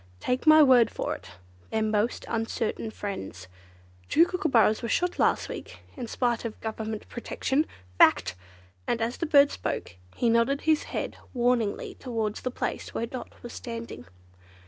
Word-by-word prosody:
Take 250 - -1
my 310 0 +9
word 255 -4 +6
for - - -3
it, - - -10 0.4
they're 220 0 0
most 215 +2 0
uncertain 225 0 -2
friends. 95 - -6 0.6
Two 330 - +6
Kookooburras 280 - +2
were 235 - -3
shot 355 +7 0
last - - +2
week, - - -8
in 250 -5 -5
spite 240 -1 0
of 230 -2 -5
Government 220 -1 -5
protection. 265 +5 -1 0.3
Fact!" 85 +3 +5 0.5
And 235 - 0
as 230 +2 -1
the 335 - -2
bird 285 -2 +6
spoke 90 - -4 0.2
he 240 - +1
nodded 235 +5 +3
his 315 -1 +2
head - - -3 0.2
warningly 240 -4 +1
towards 225 -4 -3
the 255 - -2
place 250 - -4
where 230 - 0
Dot 250 +2 -7
was 240 - -8
standing. 230 - -7
235 Hz, 155 wpm, -27 LUFS, 220-265 Hz, 0.6 s, my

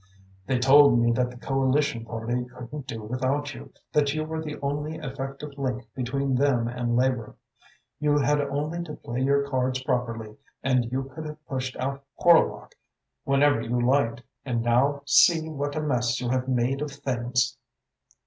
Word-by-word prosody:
They 130 -1 +1
told 135 +1 +7
me 120 0 +3
that 125 +1 +1
the 125 - -11
Coalition 135 -2 0
Party 120 +2 -2
couldn't 125 +3 -9
do 110 -1 -6
without 130 +5 -1
you, - - -11 0.2
that 145 -1 +2
you 155 - -1
were 160 0 -4
the 150 -1 -6
only 145 +2 -2
effective 140 0 -6
link 125 -3 -2
between 135 +2 -1
them 125 -3 +2
and 120 0 -1
Labour. 125 -3 0 0.6
You 145 -1 +2
had 145 +1 +2
only 145 +4 -2
to 150 - -7
play 120 +2 -5
your 140 +1 +2
cards 130 -1 -1
properly 115 -3 -2 0.3
and 125 -3 +1
you 130 +1 -1
could 160 0 -6
have 150 0 -10
pushed 130 -1 -3
out 135 +1 -3
Horlock 170 -2 +3 0.5
whenever 140 -2 +3
you 120 +2 -1
liked. 120 -1 +1 0.2
And 120 -3 -1
now 135 +4 +2
see 160 +2 +5
what 145 -1 -3
a 155 - -1
mess 125 -4 0
you 125 - -2
have 130 0 0
made 130 +2 0
of 150 - -2
things! 125 -3 -1
130 Hz, 170 wpm, -26 LUFS, 125-145 Hz, 0.6 s, told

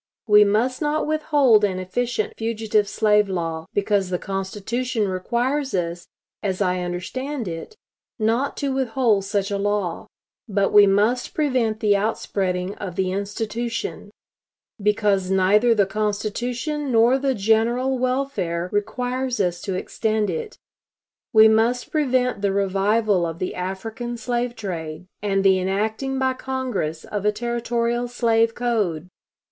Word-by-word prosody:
We 210 -1 +7
must 225 +7 +1
not 300 0 0
withhold 290 -8 +3
an 190 -3 +1
efficient 215 +4 -2
fugitive 220 -2 0
slave 210 -2 +3
law, 165 -3 -3
because 200 -2 +1
the 180 - 0
Constitution 205 +5 -2
requires 245 +9 -1
us, 175 -1 -3 0.3
as 190 -2 -2
I 185 -2 +1
understand 220 +9 -4
it, 165 - -6 0.4
not 230 +5 0
to 280 -2 -1
withhold 240 -6 +1
such 200 0 -1
a 200 - -1
law. 200 -4 -1 0.4
But 200 -1 +1
we 205 -1 +8
must 210 +6 +1
prevent 250 -8 0
the 205 -1 +4
outspreading 195 -3 -1
of 185 -4 -5
the 190 -1 0
institution, 215 +3 -3 0.7
because 205 -2 +1
neither 205 +5 +4
the 205 -2 +4
Constitution 235 +8 -2
nor 235 +3 +4
the 270 -1 0
general 235 +5 +1
welfare 250 -10 -1
requires 250 +4 -1
us 180 -3 0
to 190 - -3
extend 215 +2 -1
it. 460 -2 -5 0.7
We 220 0 +8
must 225 +3 +2
prevent 255 -7 +1
the 200 -1 +1
revival 200 0 +1
of 165 -1 -3
the 185 - -3
African 225 +6 -5
slave 240 +1 -2
trade, 165 -6 -5 0.2
and 195 -1 0
the 190 -1 +5
enacting 220 +8 -1
by 260 0 +1
Congress 255 -12 -3
of 205 -2 -4
a 210 - +3
Territorial 235 +1 -1
slave 230 -2 +2
code. 205 -9 -1
215 Hz, 135 wpm, -23 LUFS, 195-245 Hz, 0.7 s, we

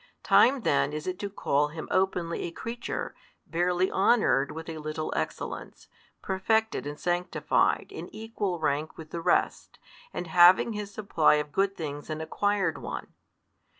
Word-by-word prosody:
Time 265 0 +5
then 145 -5 +1
is 150 0 -4
it 185 0 -3
to 205 - -3
call 150 -7 +1
Him 160 +1 -7
openly 180 -3 0
a 170 - -4
creature, 230 +7 -5 0.3
barely 180 +2 +1
honoured 190 - +3
with 160 0 -7
a 160 -1 -6
little 155 +1 -4
excellence, 80 - -5 0.4
perfected 220 -1 0
and 145 0 -6
sanctified 175 +1 0
in - - -7
equal 215 -4 -3
rank 155 0 -1
with 160 -1 -10
the 170 - -4
rest, - - 0 0.3
and - - -4
having 175 +6 +6
His 210 -1 -5
supply 200 -8 +3
of 150 0 -2
good 195 +3 0
things 145 -2 -6
an 155 0 -3
acquired 205 +5 0
one. - - -6
175 Hz, 150 wpm, -28 LUFS, 155-200 Hz, 0.4 s, having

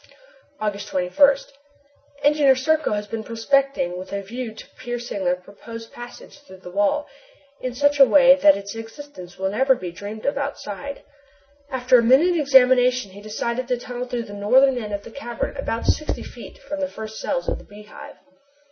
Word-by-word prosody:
August 205 -1 -3
21. 275 +10 +3 0.9
Engineer 290 -2 +5
Serko 310 +1 +1
has 210 0 -2
been 220 +1 -5
prospecting 230 -5 0
with 185 - -9
a 200 0 -3
view 235 +3 -6
to 220 - -12
piercing 240 -5 -5
the 180 0 +3
proposed 225 +5 -11
passage 240 +4 -11
through 190 -10 -15
the 180 -1 -11
wall, 205 +10 +1 0.6
in 255 -1 -4
such 285 +2 +2
a - - +11
way 270 0 +7
that 290 +1 +5
its 200 0 -7
existence 225 -5 -10
will 190 0 -1
never 265 +5 +3
be 180 -7 -6
dreamed 205 +5 -8
of 280 0 0
outside. 280 -1 -5 0.7
After 255 -1 +4
a - - +1
minute 285 +10 +5
examination 255 - +4
he 200 +2 -12
decided 235 +4 -3
to 250 - 0
tunnel 245 +1 -6
through 245 -1 -3
the 205 - -11
northern 250 +6 +3
end 210 -3 -6
of 200 0 -4
the - - -11
cavern 240 -3 -5
about 230 - -3
sixty 305 - -1
feet - - -11
from 295 - -6
the 280 -1 -1
first 220 -3 -8
cells - - -2
of - - -1
the - - -13
Beehive. 210 +1 -12
240 Hz, 180 wpm, -22 LUFS, 205-275 Hz, 0.9 s, a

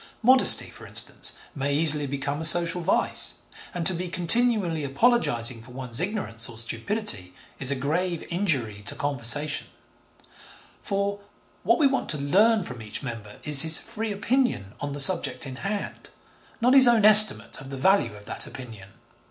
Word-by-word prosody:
Modesty, 255 +2 +4
for - - -15
instance, - - 0 0.2
may 140 0 -4
easily 150 -2 +2
become 140 +2 -6
a - - -6
social 170 +2 +4
vice, 170 - 0 0.4
and 175 -2 -6
to 185 - +5
be 180 +1 -6
continually 180 -2 0
apologising 135 - -1
for 125 +2 -17
one's 125 -2 -2
ignorance 175 - +1
or 115 - -8
stupidity 115 - -2 0.2
is 130 - +6
a 140 - +2
grave 165 +6 -4
injury 135 - -3
to - - -2
conversation, 145 +1 -1 1.1
for, 200 0 -4 0.4
'what - - 0
we 310 - 0
want 270 -1 -2
to 150 - +2
learn 200 +10 0
from 125 -7 -11
each 110 +3 -8
member 115 -5 -10
is 150 -2 +6
his 160 0 +4
free 225 -1 -7
opinion 205 - -3
on 145 -1 -6
the 145 - -8
subject 140 -6 +1
in 130 -1 -9
hand, 200 +4 -7 0.5
not 250 +2 +1
his 265 -2 +7
own 230 -3 +2
estimate 215 -8 +7
of 135 - -13
the 135 - -8
value 130 - 0
of 105 0 -15
that - - -4
opinion.' 110 -7 -13
150 Hz, 165 wpm, -23 LUFS, 130-200 Hz, 1.1 s, his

